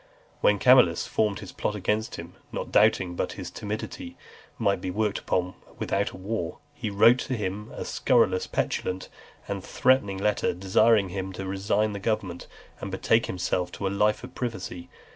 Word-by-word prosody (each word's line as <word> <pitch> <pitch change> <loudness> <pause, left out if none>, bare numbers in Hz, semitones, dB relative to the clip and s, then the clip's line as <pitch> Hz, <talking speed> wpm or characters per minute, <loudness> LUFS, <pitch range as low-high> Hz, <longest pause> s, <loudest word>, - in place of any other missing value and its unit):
When 105 - +4
Camillus 125 -7 +5
formed 105 -2 0
his 100 - -8
plot 105 - -2
against 105 +2 -1
him, 85 +1 -8 0.2
not - - -5
doubting 90 -2 +4
but - - -2
his - - -7
timidity 255 - -6 0.4
might 100 -5 +1
be 95 - -3
worked 105 +2 0
upon 90 0 -1 0.2
without 100 +1 0
a - - -11
war, 95 -3 -3 0.2
he 125 -7 -4
wrote 115 +5 +6
to 130 - -2
him 105 +1 -4
a - - -6
scurrilous, 110 -8 +2
petulant, 95 0 -2 0.4
and 100 -2 -4
threatening 125 -7 +2
letter, 105 -1 +1
desiring 100 +2 +3
him 95 +1 -4
to 95 +1 -5
resign 100 +3 0
the 100 - -4
government, 95 -4 -2 0.3
and 100 - -5
betake 110 +4 +2
himself 90 0 -1
to 100 - -4
a - - +2
life 105 +3 +1
of 125 +1 -9
privacy. 95 -7 -5
100 Hz, 170 wpm, -26 LUFS, 95-110 Hz, 0.4 s, wrote